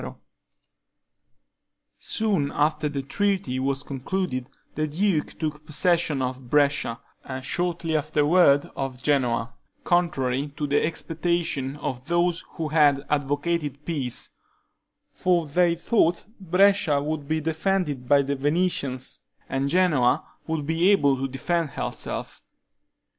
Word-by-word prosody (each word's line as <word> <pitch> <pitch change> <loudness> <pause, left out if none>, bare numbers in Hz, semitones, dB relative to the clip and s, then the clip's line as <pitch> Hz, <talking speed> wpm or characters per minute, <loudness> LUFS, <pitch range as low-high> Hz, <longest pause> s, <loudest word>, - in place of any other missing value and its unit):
Soon 195 -11 0
after 150 +1 +1
the 140 -2 -3
treaty 190 -3 -1
was 135 +1 -1
concluded, 135 -1 -3 0.2
the 155 +1 -1
duke 170 +1 0
took 150 -2 -3
possession 155 -2 +1
of 130 -1 -5
Brescia, 145 -5 +2 0.2
and 130 -1 -6
shortly 170 -1 -1
afterward 150 0 +3
of 130 -1 -4
Genoa, 125 -5 +1 0.3
contrary 145 -6 +1
to 150 - -1
the 145 0 +2
expectation 165 -4 -1
of 130 -2 -5
those 175 0 +1
who 160 -2 -3
had 145 -3 +4
advocated 145 0 -1
peace; 140 -8 -3 0.8
for 175 -2 +1
they 170 +3 +2
thought 170 -1 +1
Brescia 185 -4 +3
would 145 0 -3
be 160 +1 0
defended 160 -4 -1
by 140 -1 +5
the 140 +1 -1
Venetians, 140 -3 -1 0.3
and 135 +1 -1
Genoa 155 -8 +3 0.2
would 160 -3 -2
be 165 +4 +2
able 145 -9 +4
to 135 +1 -2
defend 160 +5 -1
herself. - - -4
150 Hz, 115 wpm, -25 LUFS, 140-170 Hz, 0.8 s, by